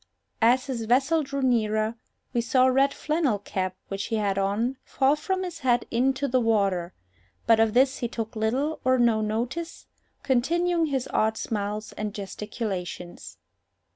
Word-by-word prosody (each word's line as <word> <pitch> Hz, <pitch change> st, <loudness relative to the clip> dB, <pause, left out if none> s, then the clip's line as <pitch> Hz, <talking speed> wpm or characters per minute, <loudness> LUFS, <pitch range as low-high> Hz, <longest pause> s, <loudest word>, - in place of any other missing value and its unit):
As 245 Hz, +3 st, +4 dB
his 245 Hz, -5 st, -3 dB
vessel 275 Hz, +8 st, +3 dB
drew 275 Hz, -1 st, -3 dB
nearer, 220 Hz, -3 st, +1 dB, 0.4 s
we 240 Hz, -, +2 dB
saw 255 Hz, +2 st, +3 dB
a 260 Hz, -, +4 dB
red 275 Hz, +2 st, +3 dB
flannel 305 Hz, -8 st, 0 dB
cap 185 Hz, -2 st, -3 dB
which 195 Hz, 0 st, -3 dB
he 225 Hz, -, -2 dB
had 205 Hz, -3 st, 0 dB
on 205 Hz, +7 st, 0 dB
fall 270 Hz, +1 st, +2 dB
from 375 Hz, +5 st, -2 dB
his 350 Hz, -2 st, -6 dB
head 245 Hz, -4 st, +2 dB
into 265 Hz, +3 st, +1 dB
the 255 Hz, 0 st, +2 dB
water; 195 Hz, -6 st, +1 dB, 0.5 s
but 225 Hz, -1 st, +5 dB
of 225 Hz, 0 st, +2 dB
this 265 Hz, +1 st, +4 dB
he 240 Hz, -, -1 dB
took 225 Hz, -1 st, -5 dB
little 255 Hz, +8 st, 0 dB
or 255 Hz, 0 st, +3 dB
no 235 Hz, -3 st, +3 dB
notice, 240 Hz, +10 st, -3 dB, 0.4 s
continuing 335 Hz, +6 st, +1 dB
his 265 Hz, -3 st, -2 dB
odd 220 Hz, 0 st, +2 dB
smiles 210 Hz, 0 st, -3 dB
and 210 Hz, -1 st, -5 dB
gesticulations. 195 Hz, -3 st, -6 dB
240 Hz, 160 wpm, -26 LUFS, 215-270 Hz, 0.5 s, but